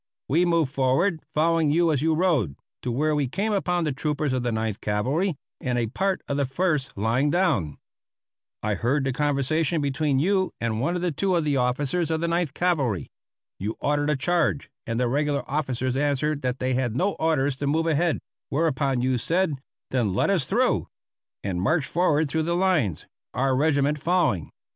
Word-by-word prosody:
We 165 +6 +3
moved 165 -5 +2
forward, 150 +6 +1
following 165 0 +3
you 165 +2 +3
as 140 -4 0
you 160 +1 +2
rode, 155 - +1 0.3
to 125 - -2
where 150 +6 +1
we 145 -2 +1
came 205 - -1
upon 180 -3 0
the 150 - 0
troopers 145 0 -1
of 130 - 0
the 120 0 -1
Ninth 110 -2 -2
Cavalry 135 - 0 0.2
and 125 -2 -1
a 120 - +1
part 190 - -1
of 140 - -1
the 140 - +1
First 145 - -1
lying 115 +8 +1
down. 145 - +1 0.9
I 105 0 0
heard 125 +9 0
the 135 -1 -1
conversation 150 +4 +1
between 140 0 0
you 190 +5 +1
and 115 -1 -1
one 170 +7 0
or 180 0 -1
two 185 +5 0
of 170 - +2
the 145 -2 +1
officers 135 +7 0
of 160 -1 0
the 170 - -1
Ninth 170 -4 -1
Cavalry. 140 - 0 0.5
You 105 +4 -3
ordered 145 0 0
a 150 - +2
charge, 160 0 0 0.2
and 115 +1 -1
the 125 - +2
regular 145 +3 0
officers 130 -3 -1
answered 145 +1 0
that 125 0 -1
they 130 0 -1
had 125 -3 -1
no 190 +9 +1
orders 145 -4 +1
to 140 - -2
move 160 +3 +1
ahead; 165 0 +2 0.3
whereupon 140 -4 0
you 130 -1 +1
said: 175 +4 +1 0.4
"Then 115 -8 0
let 195 - +2
us 175 -9 +1
through," - - +1 0.6
and 90 -3 -2
marched 150 - +1
forward 160 -3 +2
through 160 +3 -1
the 170 - +1
lines, 175 - +1 0.3
our 130 +1 +2
regiment 145 +1 +2
following. 160 - +1
145 Hz, 185 wpm, -25 LUFS, 130-165 Hz, 0.9 s, We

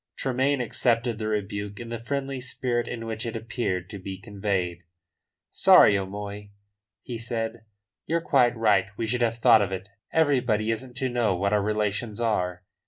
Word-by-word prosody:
Tremayne 135 +1 0
accepted 120 -1 +1
the 110 - -2
rebuke 100 -1 -3
in 120 -1 -7
the 115 -1 -4
friendly 135 +2 -3
spirit 120 -2 -1
in 115 -1 -5
which 110 0 -4
it 115 0 -4
appeared 110 -5 -2
to 100 - -6
be 95 0 -6
conveyed. 95 -4 -2 0.7
"Sorry, 100 - +7
O'Moy," 100 +1 -5 0.5
he 120 -2 -6
said. 115 -1 -4 0.4
"You're 165 +1 +1
quite 125 -7 +3
right. 105 -4 +3
We 115 - -1
should 120 +2 -1
have 115 -1 +1
thought 115 -2 +6
of 100 -2 -1
it. 95 +1 -5 0.2
Everybody 125 -8 +2
isn't 125 +2 -5
to 130 0 0
know 120 -6 +1
what 100 +3 0
our 105 - +3
relations 105 +1 -1
are." 90 -6 -1
115 Hz, 170 wpm, -26 LUFS, 100-120 Hz, 0.7 s, Sorry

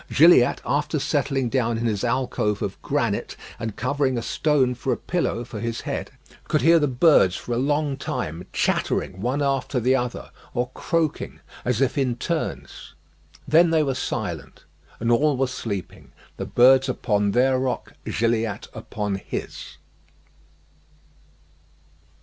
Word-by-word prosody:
Gilliatt, 155 -6 +6
after 150 +2 0
settling 140 -2 0
down 115 -2 0
in 115 - -2
his 105 -4 -1
alcove 120 -4 0
of - - -5
granite, - - -1 0.2
and 110 -3 -4
covering 130 +1 0
a 115 - -2
stone 140 -2 +1
for 125 +2 -3
a - - 0
pillow 170 -9 -2
for 115 -2 -8
his 115 +1 -3
head, - - -4 0.4
could - - 0
hear 165 +2 +6
the 145 - +2
birds 125 - +4
for 120 - -4
a - - 0
long 145 +1 0
time 80 - -4
chattering 95 - -1
one 130 +6 0
after 135 -1 0
the 125 +3 +3
other, 125 -2 -3 0.2
or 125 +1 -1
croaking, 165 -3 -2 0.2
as 125 0 0
if 135 +2 +1
in 130 -3 +1
turns. 160 +6 -4 0.5
Then 165 +4 +5
they 160 -1 +3
were 135 -2 0
silent, - - -4 0.4
and 115 +1 0
all 145 +3 +3
were 135 - +2
sleeping 115 -7 -6 0.2
the - - -4
birds 130 +2 +5
upon 105 -5 0
their 130 +4 +3
rock, 130 -1 -3
Gilliatt 115 -1 -1
upon 105 -2 -4
his. - - -6
125 Hz, 145 wpm, -24 LUFS, 115-140 Hz, 0.5 s, Gilliatt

